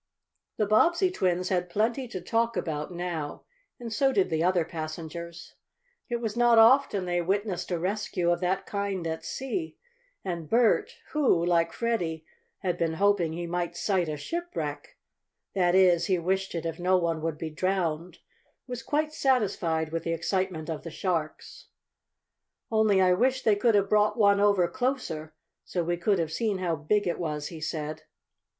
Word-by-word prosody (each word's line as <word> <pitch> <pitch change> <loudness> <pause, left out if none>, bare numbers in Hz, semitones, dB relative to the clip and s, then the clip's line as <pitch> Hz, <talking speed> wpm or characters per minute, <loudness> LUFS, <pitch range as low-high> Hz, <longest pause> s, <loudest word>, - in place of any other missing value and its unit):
The 215 - +2
Bobbsey 340 - +3
twins 180 - 0
had 180 -1 0
plenty 230 +7 0
to 190 - -5
talk 230 +5 0
about 150 0 -3
now, 170 -4 -4 0.4
and 235 -2 -6
so 270 +4 +3
did 195 -7 +1
the 160 0 +1
other 180 -2 +2
passengers. 165 +1 -7 0.6
It 240 - -1
was 230 -2 -3
not 240 -1 +4
often 225 -4 +5
they 175 0 0
witnessed 190 0 -1
a 175 - 0
rescue 180 -1 -1
of 175 - +1
that 190 +2 -1
kind 200 -3 -3
at 160 0 -3
sea, 320 +6 -4 0.5
and 170 -4 -4
Bert, 245 - +3 0.2
who, 265 - +2
like 165 -1 +2
Freddie, 170 -8 -2 0.4
had 180 -2 -1
been 165 -1 +1
hoping 190 -2 +2
he 175 +1 -4
might 175 0 -3
sight 185 -5 0
a 150 - -3
shipwreck 345 - -5 0.6
that 180 -2 +2
is, 180 -3 +4
he 190 -2 +2
wished 190 +2 -1
it 165 - -3
if 165 0 -4
no 185 +1 +3
one 165 -2 -1
would 160 -1 -2
be 160 0 -5
drowned 175 -1 -1 0.5
was 245 -1 -6
quite 305 +2 -1
satisfied 190 - +1
with 165 0 -2
the 165 - -1
excitement 180 -2 -2
of 160 -2 -4
the 165 - -7
sharks. 160 -2 -4 1.0
"Only 215 -3 +3
I 180 0 +5
wish 255 +6 +1
they 215 - +4
could 220 +2 +3
have 200 -1 +3
brought 210 +1 +3
one 200 -2 +4
over 200 -3 +4
closer, 215 - -3 0.3
so 175 - -2
we 175 +1 0
could 190 +4 +1
have 165 -2 -1
seen 215 -4 0
how 175 -3 -1
big 200 +8 0
it 175 - -1
was," 150 -3 -3
he 165 -2 -9
said. 155 0 -4
180 Hz, 170 wpm, -27 LUFS, 165-215 Hz, 1.0 s, often